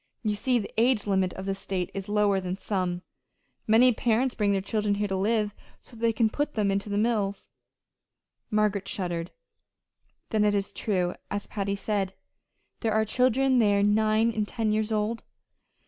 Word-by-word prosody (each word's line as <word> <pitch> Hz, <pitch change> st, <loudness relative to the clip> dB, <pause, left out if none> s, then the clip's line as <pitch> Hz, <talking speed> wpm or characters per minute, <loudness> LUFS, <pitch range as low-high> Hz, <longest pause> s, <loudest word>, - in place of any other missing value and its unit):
You 215 Hz, -2 st, +1 dB
see 245 Hz, +4 st, +1 dB
the 210 Hz, -, -4 dB
age 235 Hz, -2 st, +3 dB
limit 190 Hz, -2 st, +1 dB
of 190 Hz, -, -7 dB
this 195 Hz, 0 st, -2 dB
state 185 Hz, -3 st, -3 dB
is 195 Hz, +1 st, -5 dB
lower 205 Hz, -2 st, +2 dB
than 185 Hz, 0 st, -4 dB
some. 185 Hz, -3 st, -2 dB, 0.6 s
Many 240 Hz, +3 st, +6 dB
parents 240 Hz, +3 st, +1 dB
bring 205 Hz, -2 st, +1 dB
their 195 Hz, -, +2 dB
children 210 Hz, +1 st, -1 dB
here 205 Hz, +1 st, -1 dB
to 190 Hz, -, -2 dB
live, 210 Hz, +1 st, +1 dB, 0.3 s
so 240 Hz, -, -14 dB
that 225 Hz, -, -13 dB
they 230 Hz, 0 st, +3 dB
can 225 Hz, 0 st, +2 dB
put 290 Hz, +7 st, -2 dB
them 205 Hz, -3 st, +1 dB
into 200 Hz, +1 st, -2 dB
the 205 Hz, -, -1 dB
mills." 210 Hz, -3 st, 0 dB, 1.0 s
Margaret 210 Hz, -2 st, +1 dB
shuddered. 175 Hz, -3 st, -3 dB, 1.0 s
"Then 215 Hz, -1 st, +2 dB
it 205 Hz, -1 st, +3 dB
is 200 Hz, -1 st, -1 dB
true, 180 Hz, -4 st, -1 dB, 0.2 s
as 205 Hz, 0 st, -3 dB
Patty 200 Hz, -1 st, -2 dB
said. 200 Hz, -2 st, -2 dB, 0.6 s
There 225 Hz, -2 st, 0 dB
are 220 Hz, 0 st, +2 dB
children 255 Hz, +3 st, +3 dB
there 205 Hz, -3 st, +3 dB
nine 215 Hz, +2 st, +3 dB
and 215 Hz, -2 st, -2 dB
ten 225 Hz, -1 st, -1 dB
years 215 Hz, +1 st, 0 dB
old!" 215 Hz, +2 st, -1 dB
210 Hz, 180 wpm, -27 LUFS, 195-220 Hz, 1.0 s, Many